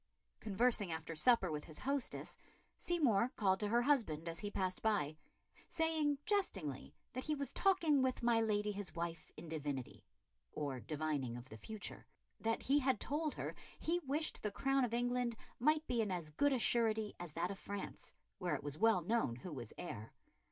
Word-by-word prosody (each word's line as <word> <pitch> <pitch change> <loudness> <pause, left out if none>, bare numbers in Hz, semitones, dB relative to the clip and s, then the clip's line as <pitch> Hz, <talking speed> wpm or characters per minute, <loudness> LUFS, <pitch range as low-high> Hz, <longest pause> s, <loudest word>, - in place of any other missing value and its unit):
Conversing 215 -2 +2
after 160 0 -4
supper 190 +1 +4
with 150 -1 -3
his 155 - -7
hostess, 275 0 -1 0.4
Seymour 255 - +2
called 190 -3 +3
to 210 - 0
her 235 +3 +3
husband 215 - +2
as 165 0 -3
he 205 - -3
passed 185 -2 -1
by, 180 -9 +1 0.5
saying 320 -3 +1
jestingly 195 - 0 0.2
that 255 - -4
he 305 - +1
was 280 -1 -4
talking 330 -8 +4
with 260 -2 0
my 235 -1 +4
lady 210 -1 +1
his 195 -5 -5
wife 170 -1 -4
in 170 - -8
divinity 145 -5 -3 0.5
or 140 -4 -2
divining 145 -4 -2
of 120 +2 -10
the - - -8
future; 215 - -5 0.3
that 225 0 0
he 280 +3 +4
had 260 -5 +2
told 300 +1 -1
her - - -3 0.2
he 340 +2 0
wished 300 0 -1
the 210 - 0
crown 270 +5 +2
of 235 -2 0
England 245 -1 +1 0.2
might 305 +5 +3
be 240 -5 +1
in 215 - 0
as 170 -4 -3
good 285 - +3
a 265 - +3
surety 220 -3 +2
as 175 -3 -6
that 175 +3 -1
of 200 - -6
France, 200 -1 -6 0.3
where 180 -2 0
it - - -5
was 145 +1 -4
well 220 -3 +5
known 215 - +1
who 150 +7 -7
was 120 -5 -6
heir. 110 +1 -6
215 Hz, 185 wpm, -38 LUFS, 165-260 Hz, 0.5 s, well